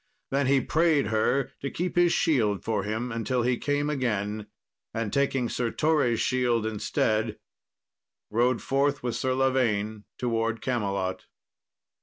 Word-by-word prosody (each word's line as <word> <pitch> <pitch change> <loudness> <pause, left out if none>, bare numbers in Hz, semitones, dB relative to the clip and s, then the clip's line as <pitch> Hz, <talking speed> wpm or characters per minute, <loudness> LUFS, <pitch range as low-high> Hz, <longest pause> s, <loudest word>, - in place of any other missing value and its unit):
Then 135 0 +1
he 135 0 +4
prayed 155 -5 +2
her 125 +5 +1
to 140 - -3
keep 180 +4 -3
his 175 -1 +4
shield 115 - +2
for 110 -3 0
him 110 +5 -3
until 120 +2 -1
he 125 0 +1
came 145 0 0
again, 105 -7 -1 0.5
and 115 -2 -2
taking 135 -3 +1
Sir 120 0 -1
Torre's 145 -5 +2
shield 120 -3 +1
instead, 110 0 0 0.9
rode 120 +3 +2
forth 140 0 +1
with 120 -2 -1
Sir 130 0 0
Lavaine 110 -6 +1
towards 115 -2 -1
Camelot. 100 -7 -2
120 Hz, 135 wpm, -27 LUFS, 110-135 Hz, 0.9 s, he